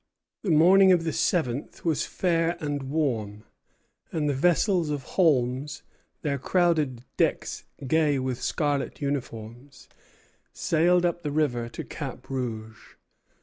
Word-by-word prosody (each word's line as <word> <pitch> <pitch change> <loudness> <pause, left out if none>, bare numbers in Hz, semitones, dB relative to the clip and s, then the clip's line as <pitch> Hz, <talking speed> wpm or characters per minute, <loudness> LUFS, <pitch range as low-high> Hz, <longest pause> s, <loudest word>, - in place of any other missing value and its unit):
The 205 - -3
morning 185 +5 +6
of 175 -2 +4
the 165 -2 -2
seventh 145 -5 -1
was 160 -4 +1
fair 170 -1 0
and 145 -3 -3
warm, 115 -9 -1 0.7
and 155 -2 -1
the 145 - +1
vessels 175 +3 +2
of 145 -2 -3
Holmes, 135 -4 +1 0.4
their 140 -3 -1
crowded 155 -7 +1
decks - - 0 0.2
gay 150 +1 +2
with 130 -2 -3
scarlet 145 -3 -1
uniforms, 130 -2 -5 0.7
sailed 175 +2 +2
up 175 0 -1
the 150 - -3
river 135 -6 0
to - - -6
Cap - - -7
Rouge. 110 -4 -5
145 Hz, 125 wpm, -26 LUFS, 130-165 Hz, 0.7 s, morning